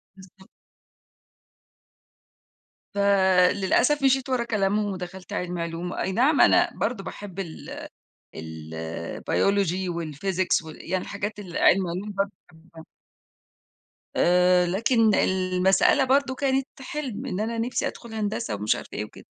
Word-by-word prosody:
بالضبط. 190 0 -17 2.5
فللأسف 200 +6 +3
مشيت 265 -1 +3
ورّا 255 -2 0
كلامهم 205 -2 0
ودخلت 185 0 -8
علمي 175 -1 -3
علوم، 170 +1 -4
أي 190 - -2
نعم 270 +8 +3
أنا - - +5
برضه 220 -5 -2
باحب 195 -2 -8
ال 170 -5 -7 0.5
الbiology 85 - -2
والphysics 170 +2 -1
و - - -8
يعني 180 +4 -4
الحاجات 205 +1 -5
اللي 180 -4 -5
علمي 190 -2 +4
علوم 190 +5 -4
برضه 200 0 0 0.2
باحبها. 160 0 -15 1.3
آآ، 180 0 +4
لكن 220 +4 +2
المسألة 185 +6 +3
برضه 265 0 +2
كانت 270 -1 0
حلْم 265 -3 -5
إن 190 - -3
أنا 230 +1 -2
نِفْسي 240 +2 -1
أدخل 235 -2 -7
هندسة 210 - -2
ومش 105 +1 +1
عارفة - - -9
إيه 105 - -2
وكده. - - -14
190 Hz, 120 wpm, -25 LUFS, 175-220 Hz, 2.5 s, أنا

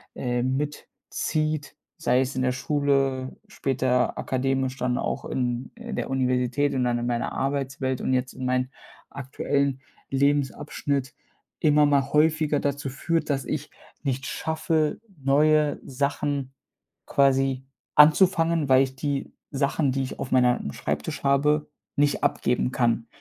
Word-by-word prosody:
äh, 120 -1 -1
mitzieht, 150 +2 -3 0.2
sei 125 +2 +2
es 130 +1 -2
in 130 - +1
der 130 - +2
Schule, 135 -1 0
später 130 -1 0
akademisch, 135 0 -1
dann 125 0 0
auch - - -3
in 125 0 -2
in 235 -2 -7
der - - -2
Universität 130 +1 +1
und 130 -2 +1
dann 120 -1 +1
in 120 - -3
meiner 120 -1 -1
Arbeitswelt 135 -1 -2
und 130 - 0
jetzt 125 0 0
in 130 0 -6
meinen 130 +1 0 0.4
aktuellen 140 0 -1 0.3
Lebensabschnitt 140 -1 0 0.5
immer 150 -1 +4
mal 140 -1 +1
häufiger 155 -1 +3
dazu 140 -1 -2
führt, 165 +5 -1
dass 135 -2 0
ich - - -4 0.3
nicht 135 -2 -2
schaffe, 160 -1 -1 0.2
neue 150 +2 +3
Sachen 140 0 -2 0.5
quasi 135 -1 +2 0.3
anzufangen, 165 0 +5
weil 130 0 +6
ich 130 -1 -5
die 140 0 -3 0.2
Sachen, 140 0 +1
die 135 +1 -1
ich 130 - -6
auf 125 - -5
meinem 125 - +2
Schreibtisch 75 +1 -3
habe, 145 +2 +2 0.3
nicht 145 0 +1
abgeben 125 +1 +1
kann. 115 -2 +1
135 Hz, 135 wpm, -25 LUFS, 130-145 Hz, 0.5 s, weil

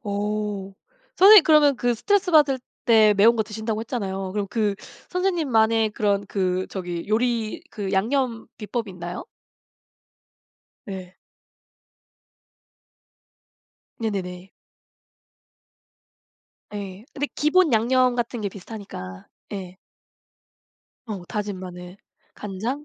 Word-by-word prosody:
오. 205 -1 -3 0.4
선생님 400 -2 +9
그러면 300 -3 +5
그 245 0 +1
스트레스 395 - +1
받을 295 -5 +5 0.3
때 215 -3 +6
매운 225 +4 +6
거 220 - +2
드신다고 220 +1 -4
했잖아요. 195 -5 -4
그럼 205 0 -2
그 210 -2 0 0.4
선생님만의 245 - +2
그런 205 -1 0
그 185 -2 -1
저기 175 -3 -5
요리 230 +2 0
그 200 -3 -4
양념 230 +3 0
비법이 220 0 -4
있나요? 175 -1 -7 1.6
예. 185 -2 -7 2.9
네네네. 190 -4 -4 2.3
예. 200 0 -7
근데 290 +1 -1
기본 310 +1 +3
양념 250 +2 +3
같은 240 0 -2
게 205 - -1
비슷하니까 180 - -9 0.3
예. 185 -2 -6 1.3
어 200 -5 -5
다진 205 -2 -4
마늘, 180 0 -9 0.4
간장, 220 +9 -4
215 Hz, 200 characters per minute, -24 LUFS, 195-245 Hz, 2.9 s, 선생님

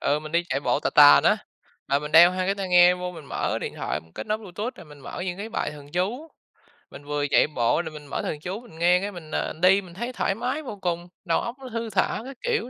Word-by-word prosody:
Ừ, 145 +1 +1
mình 155 0 -9
đi 170 +1 +2
chạy 135 - -1
bộ - - 0
tà - - -1
tà - - +8
á, - - +5 0.5
rồi 140 +1 +2
mình 150 +1 -7
đeo 170 +3 +9
hai 185 0 -2
cái 195 - +1
tai 195 -2 -4
nghe 180 0 +6
vô 180 0 -5
mình 165 -4 -11
mở - - -2
điện - - -5
thoại - - -3
mình 80 0 -23
kết - - -7
nối 215 0 -1
Bluetooth 210 +4 -6
rồi - - -12
mình 150 -2 -15
mở 135 - -7
những 180 0 -4
cái 210 +2 -5
bài 225 - -2
thần 145 -1 -13
chú, 225 - -2 0.6
mình 145 - -11
vừa 145 0 -1
chạy - - +4
bộ 130 +2 +1
rồi 160 - -7
mình 150 -1 -10
mở 140 - -3
thần 150 - -4
chú 185 +7 -5
mình 160 - -14
nghe 175 +2 +4
cái 205 +1 -3
mình, 165 -5 -11
à, - - -2
đi 190 +2 +5
mình 180 -3 -13
thấy 240 +7 -5
thoải 195 - -1
mái 250 +7 -2
vô 230 -7 -7
cùng, 175 -1 -2 0.2
đầu 165 -2 +2
óc 235 - -5
nó 260 -1 -9
thư 230 -1 -4
thả 195 0 0
các 270 -1 -9
kiểu 465 - -1
180 Hz, 285 wpm, -25 LUFS, 155-210 Hz, 0.6 s, đeo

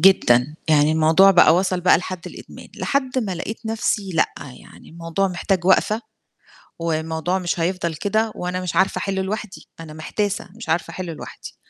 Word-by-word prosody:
جدًا، 150 -7 +4
يعني 150 0 +4
الموضوع 160 +5 +5
بقى 175 -3 +6
وصل 185 0 +1
بقى 180 - +5
لحد 180 -1 -7
الإدمان، - - -11
لحد 265 -2 -1
ما 205 -7 -2
لقيت 220 +6 -6
نَفْسي 210 -2 -1
لأ، 165 - +1
يعني 135 -3 -13
الموضوع 165 +3 -2
محتاج 180 0 -1
وقفة، 210 +3 +3 0.8
والموضوع 160 +2 -1
مش 175 -1 -2
هيفضل 170 -1 -1
كده 215 +7 0
وأنا 180 +1 -3
مش 180 -2 -4
عارفة 190 +2 +2
أحلّه 195 -1 -2
لوحدي، 205 0 -5
أنا 160 -2 -9
محتاسة 200 +6 -3
مش 230 - -10
عارفة 160 +1 0
أحلّه 180 -3 -5
لوحدي. 155 - -10
180 Hz, 165 wpm, -21 LUFS, 160-195 Hz, 0.8 s, بقى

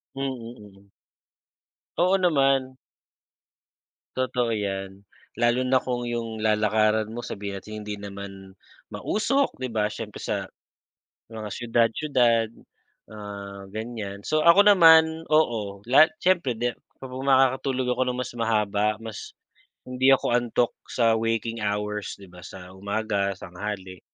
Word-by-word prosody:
Hmm, 135 - -5
mm. 115 -6 -8 1.1
Oo, 185 +2 +4
naman. 135 -6 +2 1.4
Totoo 125 -2 0
‘yan. 95 -2 -4 0.4
Lalo 120 +2 +2
na 130 0 +3
kung 125 -1 -3
yung 115 -2 -4
lalakaran 110 0 +2
mo, 120 - -5
sabihin 100 -1 -5
natin 110 +2 -8
hindi 105 0 -5
naman 100 -1 -9 0.4
mausok, 270 +6 0
‘di 130 -2 -5
ba? 105 -1 +1
Siyempre 105 0 -7
sa - - -2 0.9
mga 110 -1 -6
siyudad-siyudad, 115 0 +1 0.6
ah, 100 -2 -8
ganyan. 110 -3 -6
So, 155 +7 0
ako 170 +4 +8
naman, 165 -5 +6
oo, 110 -11 +1
la 135 +5 +8 0.2
siyempre 175 -8 +2
di 120 +2 -1 0.3
kapag 130 0 -7
makakatulog 130 -1 +2
ako - - 0
nang 125 0 -2
mas - - -5
mahaba, 105 -2 +1
mas 110 -2 -8 0.6
hindi 130 +1 +4
ako 135 - +1
antok 120 0 0 0.2
sa 115 -2 +2
waking 115 0 -2
hours, 105 0 -2
‘di 95 - -13
ba, 90 0 -14
sa 90 0 -11
umaga, 100 0 -1
tanghali 95 0 -7
115 Hz, 125 wpm, -25 LUFS, 105-130 Hz, 1.4 s, ako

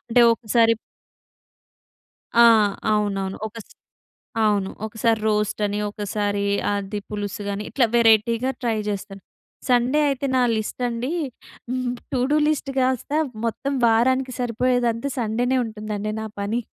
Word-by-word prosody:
అంటే 245 - +5
ఒకసారి 230 0 +3 1.7
ఆ! - - +9 0.5
అవునవును. 195 -2 -1
ఒక 220 - -11
స్ - - -18 0.7
అవును. 200 -2 +1 0.2
ఒకసారి 225 0 0
రోస్ట్ 210 0 0
అని, 205 0 -2
ఒకసారి 205 0 -2 0.3
అది 200 +1 -3
పులుసు 205 -1 -4
అని, 205 +1 -5
ఇట్లా 250 -4 +3
వెరైటీగా 230 +2 +4
ట్రై 230 -2 0
చేస్తాను. 195 -1 -5 0.5
సండే 250 +4 +3
అయితే 275 0 -1
నా - - +4 0.2
లిస్ట్ 215 +3 -4
అండి, 240 +6 -3 1.0
టూడూ 265 +4 +1
లిస్ట్ 290 -2 -1
కాస్త 260 +1 0 0.3
మొత్తం 270 +5 -2
వారానికి 255 +3 +2
సరిపోయేదంతా 245 +1 0
సండేనే 245 +3 0
ఉంటుందండి 215 -1 -4
నా 220 - -4
పని. 215 +4 -1
225 Hz, 120 wpm, -23 LUFS, 210-245 Hz, 1.7 s, ఆ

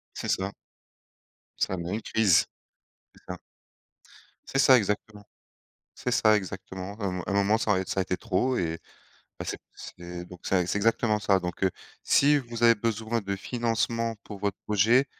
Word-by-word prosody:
C'est - - -5
ça. 95 +1 0 1.1
Ça 95 - 0
amène 85 +2 -3
une 110 - -3
crise, 100 -7 +3 0.7
c'est - - -21
ça. 90 -1 -5 1.1
C'est 135 - -2
ça, 135 -1 +7
exactement, 105 -1 -2 0.7
c'est 125 - -3
ça, 110 -2 +5
exactement. 95 0 -5
À 100 - -2
un 95 - 0
mo 90 -1 -4
à - - -5
un - - 0
moment 100 +2 +3
ça 105 -2 +1
a 95 0 0
ça 95 - -2
a - - +1
été 90 -1 -2
trop 120 +5 0
et, 80 -2 -1 0.6
bah, - - -4
c'est - - -3 0.2
c'est 90 0 -9
donc 90 0 -12
c'est 90 -2 +1
c'est 105 - 0
exactement 110 0 +2
ça. 95 0 +3
Donc 90 +1 -4
heu, 95 - +4 0.3
si 145 +1 +5
vous 120 -3 -5
avez 115 0 +7
besoin 115 +1 -1
de 100 0 -3
financement 115 +1 -1
pour 100 -2 -9
votre 100 -1 -2
projet, 110 +6 +4
105 Hz, 180 wpm, -27 LUFS, 95-115 Hz, 1.1 s, ça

